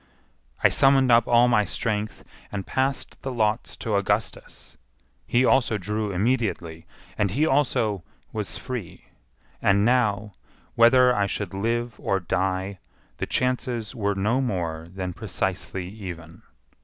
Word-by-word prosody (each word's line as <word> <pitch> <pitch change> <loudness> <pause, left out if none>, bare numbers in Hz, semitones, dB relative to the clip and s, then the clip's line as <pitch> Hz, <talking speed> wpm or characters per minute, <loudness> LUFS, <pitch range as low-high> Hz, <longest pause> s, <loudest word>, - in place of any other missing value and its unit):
I - - +7
summoned 135 -2 +4
up 115 0 +5
all 120 +1 +5
my 120 -3 +4
strength, 105 0 -3 0.3
and 100 -2 -4
passed 135 +1 -2
the 135 - -4
lots 110 -1 0
to 110 -3 -2
Augustus. 100 +1 -2 0.5
He 125 +2 +3
also 125 -5 +3
drew 105 +2 -2
immediately, 95 -6 -1 0.3
and 100 - +2
he 140 +12 +1
also 125 - +1 0.3
was 105 -2 -4
free; 125 -9 -6 0.6
and 100 +1 +3
now, 105 -4 +1 0.4
whether 125 +2 +6
I 100 -1 +1
should - - -4
live 115 +3 -2
or 95 - 0
die, 95 +2 -2 0.4
the - - -3
chances 125 -3 -1
were 100 -2 -1
no 110 +7 +1
more 85 -9 -2
than 95 -1 -4
precisely 95 -3 -3
even. 90 -5 -9
105 Hz, 130 wpm, -25 LUFS, 95-120 Hz, 0.6 s, I